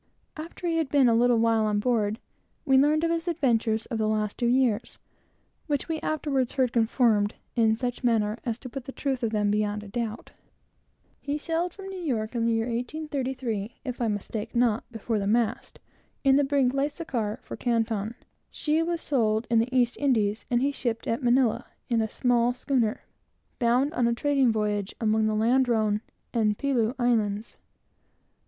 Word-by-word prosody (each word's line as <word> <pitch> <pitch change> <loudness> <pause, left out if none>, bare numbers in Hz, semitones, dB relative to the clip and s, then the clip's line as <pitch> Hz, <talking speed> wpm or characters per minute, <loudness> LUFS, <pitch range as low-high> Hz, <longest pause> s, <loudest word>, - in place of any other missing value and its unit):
After 330 +3 -8
he 335 -1 +1
had 320 -4 0
been 280 -3 +4
a 230 - +4
little 240 +1 +4
while 225 -1 +3
on 210 -1 +1
board, 215 -2 +1 0.5
we 270 -2 +4
learned 300 +4 +4
from 335 - +2
him 335 - +2
his 330 +2 -9
remarkable 300 -7 +1
history, 225 -1 +1
for 225 +2 -6
the 215 -1 0
last 215 -1 -1
two 240 - 0
years, 240 -2 +1 0.7
which 290 -3 -1
we 320 -1 -2
afterwards 285 -5 -1
heard 255 -3 +1
confirmed 225 -3 +2 0.2
in 220 -2 +3
such 245 +1 -3
a - - -4
manner, 220 -1 +1
as 230 -3 -2
put 255 0 -8
the 270 - -6
truth 270 -2 -2
of 225 -2 -1
it 205 -1 +2
beyond 210 0 -1
a - - -10
doubt. 225 +1 -4 0.9
He 290 +1 -2
sailed 330 +3 -2
from 390 -1 -8
New 380 -1 -6
York 240 -9 -2
in 230 -1 0
the - - +2
year 225 0 +1
1833, 250 -3 -3
if 250 -2 -4
I 235 - +2
mistake 210 +2 -4
not, 235 -1 +1
before 225 -1 -2
the 200 - -2
mast, 230 +2 0 0.5
in 270 -1 +5
the 285 - +4
brig 270 -2 +2
Lascar, 275 -6 -2
for - - -7
Canton. 225 -2 -1 0.3
She 310 +1 0
was 340 0 -1
sold 220 -5 +1
in 230 - +5
the 230 +2 +1
East 245 -2 +2
Indies, 220 -7 +1
and 240 +1 +2
he 280 - +2
shipped 235 -5 -3
at 230 +5 -1
Manilla, 245 -1 +2 0.2
in 230 -2 +2
a 220 - -1
small 245 0 +2
schooner, 250 -3 0 0.6
bound 250 +5 +2
on 245 -6 +2
a 235 - +1
trading 275 -2 +2
voyage 210 -2 -1
among 220 -1 +2
the 215 - 0
Ladrone 225 -2 +2 0.3
and 215 -3 +1
Pelew 250 -4 0
Islands. 220 -4 0
240 Hz, 185 wpm, -26 LUFS, 220-270 Hz, 0.9 s, in